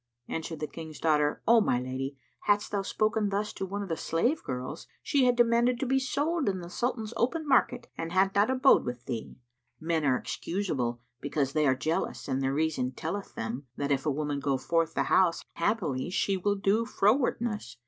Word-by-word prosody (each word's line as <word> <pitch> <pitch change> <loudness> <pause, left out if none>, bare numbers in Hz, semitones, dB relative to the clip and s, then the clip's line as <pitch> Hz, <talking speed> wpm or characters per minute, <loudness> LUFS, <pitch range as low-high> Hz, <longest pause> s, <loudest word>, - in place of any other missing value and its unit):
Answered 160 -1 -4
the 155 - -2
King's 160 0 -9
daughter, 150 -2 +2
"O 230 0 +7
my 125 -11 +2
lady, 130 +2 -4 0.3
hadst 205 0 +2
thou 200 -1 0
spoken 215 +1 0
thus 205 +2 -1
to 190 - -4
one 200 +2 -3
of - - -6
the 165 - -1
slave 235 - 0
girls, 125 0 -5 0.2
she 275 -3 +3
had 245 -1 +4
demanded 240 +1 +3
to - - -1
be 265 +1 +2
sold 290 +2 0
in 190 -1 -2
the 175 0 -8
Sultan's 235 -1 -2
open 310 +7 0
market 245 -3 +2
and 165 0 -3
had 190 +2 +3
not 205 +4 +3
abode 260 +1 +5
with 125 0 -5
thee.[FN#86] 120 -4 -5 0.5
Men 165 -2 +1
are 130 -3 +3
excusable, 135 -13 -2 0.2
because 140 -1 -1
they 155 -2 +3
are 130 - +4
jealous 160 +5 -2
and 135 -1 -1
their 135 0 +1
reason 140 -4 0
telleth 185 +5 -5
them 120 +5 -4
that, 140 0 -1
if 135 -1 +1
a 155 - 0
woman 145 0 -1
go 140 -1 0
forth 165 +5 0
the - - +2
house, 180 -3 +3
haply 170 - -1
she 195 +1 +1
will 200 +2 0
do 200 +3 +2
frowardness. 220 - 0
175 Hz, 200 wpm, -29 LUFS, 140-220 Hz, 0.5 s, O